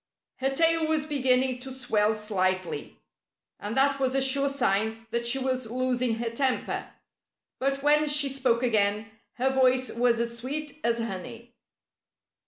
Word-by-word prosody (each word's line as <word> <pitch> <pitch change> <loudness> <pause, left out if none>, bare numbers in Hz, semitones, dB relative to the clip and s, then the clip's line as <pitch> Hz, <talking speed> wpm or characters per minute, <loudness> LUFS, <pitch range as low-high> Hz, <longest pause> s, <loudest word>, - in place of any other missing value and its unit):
Her 265 +1 0
tail 325 +3 +2
was 310 -1 +1
beginning 260 -3 +1
to 265 +1 -8
swell 220 -5 0
slightly. 185 -7 -2 0.6
And 210 +4 -5
that 275 +1 +3
was 260 0 0
a - - +3
sure 275 +1 +3
sign 225 -4 -1
that 235 0 -1
she 250 +3 +3
was 255 -3 -1
losing 250 -1 0
her 230 0 -3
temper. 260 +2 -2 0.7
But 275 +1 -1
when 300 +1 +3
she 295 -1 +3
spoke 260 -3 0
again 215 -2 +1 0.2
her 260 +2 0
voice 255 -1 +2
was 235 0 +1
as 235 0 -2
sweet 290 +4 -4
as 235 0 +1
honey. 230 +2 -6
255 Hz, 150 wpm, -27 LUFS, 230-270 Hz, 0.7 s, that